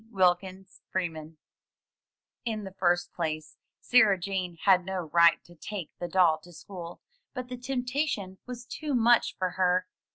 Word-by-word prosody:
Wilkins 190 -1 0
Freeman 160 -4 -4 1.1
In 220 -3 -3
the 190 -1 -8
first 175 -2 +1
place, 155 -3 -4 0.2
Sarah 220 -6 +5
Jane 180 -2 -3
had 190 -2 +5
no 180 -4 -4
right 170 -1 +6
to 175 - -17
take 180 0 -6
the 175 - -3
doll 175 -4 +4
to 175 +3 -16
school, 175 0 -9 0.3
but 250 -1 -5
the 250 - -4
temptation 250 -6 -2
was 245 -1 -7
too 295 +2 -3
much 235 0 +4
for 185 -1 -1
her. 185 0 +2
185 Hz, 150 wpm, -28 LUFS, 175-220 Hz, 1.1 s, right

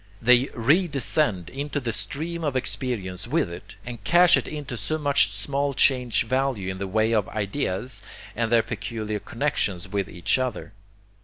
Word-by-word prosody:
They 125 +3 +5
redescend 140 - +1
into 145 +2 -3
the 120 -4 -3
stream 155 +10 -4
of 145 -4 -1
experience 115 -8 -3
with - - 0
it, 85 +2 -10
and 120 -4 -7
cash 175 +7 +6
it - - -1
into 150 -5 -5
so 140 +8 -2
much 140 -9 +3
small 140 +7 -1
change 125 -3 +3
value 130 -6 0
in 95 - -7
the 100 - -3
way 110 +3 +1
of 105 -4 +1
'ideas' 105 0 -2 0.3
and 115 0 -1
their 115 -1 +5
peculiar 110 -1 -4
connexions 105 -8 -2
with 100 -1 -2
each 85 +8 0
other. 125 -4 -3
120 Hz, 160 wpm, -25 LUFS, 100-140 Hz, 0.3 s, cash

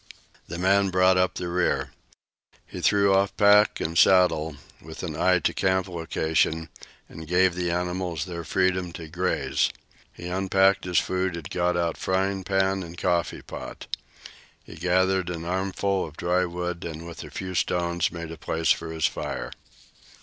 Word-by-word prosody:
The 85 - -6
man 95 +2 +3
brought 95 0 +4
up 90 0 +2
the 90 - -4
rear. 90 +1 0 0.7
He - - -8
threw 100 -1 +4
off 95 +1 +1
pack 105 +1 +5
and 80 +1 -3
saddle, 80 -4 +4 0.3
with - - -9
an - - -4
eye 90 0 +3
to 85 - 0
camp 95 0 +1
location, 80 -2 -1 0.4
and 80 0 -10
gave 90 +2 +3
the 90 0 -2
animals 90 0 -2
their 85 -2 -6
freedom 95 0 0
to 80 -2 -8
graze. 90 +3 0 0.4
He - - -11
unpacked 95 +1 +2
his 90 -1 0
food 95 -1 0
and 85 - -7
got 90 0 +1
out 85 -1 -1
frying 95 +1 0
pan 95 0 +1
and 85 -1 -9
coffee 85 -1 -1
pot. - - -8 0.8
He - - -12
gathered 90 +2 +1
an 85 -1 -5
armful 95 +1 -1
of 75 - -14
dry 90 +1 +1
wood, 90 0 -4
and 80 0 -6
with 85 -1 -8
a - - -9
few 95 -1 -6
stones 85 -1 0
made 85 -1 -7
a 85 - -8
place 80 +1 0
for 80 0 -1
his 80 -1 -1
fire. - - -3
90 Hz, 165 wpm, -25 LUFS, 85-95 Hz, 0.8 s, pack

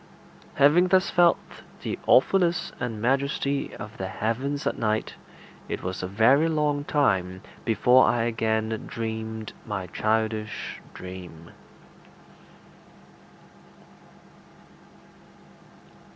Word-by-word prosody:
Having 150 +6 +5
thus 185 0 +3
felt 175 -2 +5 0.5
the - - -3
awfulness 175 +5 +3
and 115 -3 -3
majesty 140 +3 0
of 105 +1 -9
the 95 - -2
heavens 130 +9 -2
at - - 0
night, 110 -1 -1 0.6
it - - -4
was 90 0 -4
a 90 - -3
very 120 - +4
long 150 -2 0
time 95 -12 0 0.2
before 125 +3 +5
I 120 -1 +2
again 110 -1 -1
dreamed 110 -1 -5
my 105 -4 -4
childish 110 +2 -2
dream. 90 -3 -10
115 Hz, 95 wpm, -26 LUFS, 105-140 Hz, 0.6 s, Having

